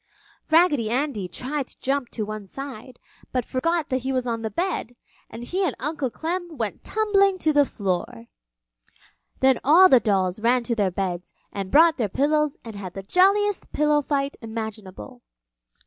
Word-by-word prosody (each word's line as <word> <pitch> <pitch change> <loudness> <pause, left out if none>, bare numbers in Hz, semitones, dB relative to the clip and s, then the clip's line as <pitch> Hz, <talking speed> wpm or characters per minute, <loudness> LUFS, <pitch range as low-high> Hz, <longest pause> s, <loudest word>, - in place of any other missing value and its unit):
Raggedy 315 -9 +4
Andy 245 -6 -1
tried 260 - -4
to - - -19
jump 270 -2 -1
to 215 - -4
one 215 -1 -7
side, 255 -1 -9 0.3
but 250 -2 -1
forgot 330 +4 -1
that 260 - 0
he 260 +1 -3
was 255 -1 -1
on 230 -2 -2
the 220 - -3
bed, 295 - -3 0.3
and 230 - -8
he 370 +10 -2
and 330 -9 0
Uncle 290 -2 -2
Clem 340 +4 -4
went 225 -4 -4
tumbling 395 -3 +2
to 315 -4 +1
the 290 -1 +4
floor. 180 - -3 1.2
Then 265 -1 +4
all 350 +7 +7
the 260 - +7
dolls 195 -4 0
ran 240 +2 +2
to 235 - -1
their 205 -4 +1
beds 180 -1 -4 0.2
and 195 -2 -4
brought 325 - +5
their 225 -6 -1
pillows 300 +5 +1
and 225 -2 -8
had 190 -3 -8
the 195 - -6
jolliest 395 - +2
pillow 300 0 +2
fight 280 -1 -2
imaginable. 220 - -7
255 Hz, 170 wpm, -24 LUFS, 215-305 Hz, 1.2 s, all